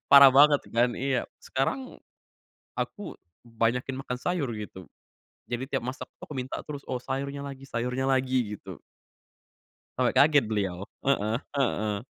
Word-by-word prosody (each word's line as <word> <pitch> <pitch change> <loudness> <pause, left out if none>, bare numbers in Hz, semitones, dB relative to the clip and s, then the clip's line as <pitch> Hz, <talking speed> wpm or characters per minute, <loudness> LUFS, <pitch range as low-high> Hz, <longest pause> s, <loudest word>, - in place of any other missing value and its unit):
Parah 140 -1 +11
banget 145 0 +7 0.2
kan. 120 +1 +5
Iya. 135 +1 0 0.3
Sekarang, 135 - 0 1.0
aku 215 - -3 0.4
banyakin 120 +3 0
makan 125 -2 -4
sayur, 175 -7 0
gitu. 95 - -9 0.7
Jadi 120 +1 -2
tiap 135 - 0
masak 130 - -5
tuh, - - -61
aku 150 - -6
minta 130 +1 -3
terus. 145 -2 -6
Oh 125 -1 -1
sayurnya 140 +2 -3
lagi 135 -1 -9
sayurnya 125 +3 -1
lagi, 130 -1 +2 0.2
gitu. - - -10 1.2
Sampai - - +2
kaget 145 -4 +6
beliau. 100 -3 -2 0.2
Heeh. 110 -5 +2 0.2
Heeh. 105 -5 0
130 Hz, 140 wpm, -28 LUFS, 115-140 Hz, 1.2 s, Parah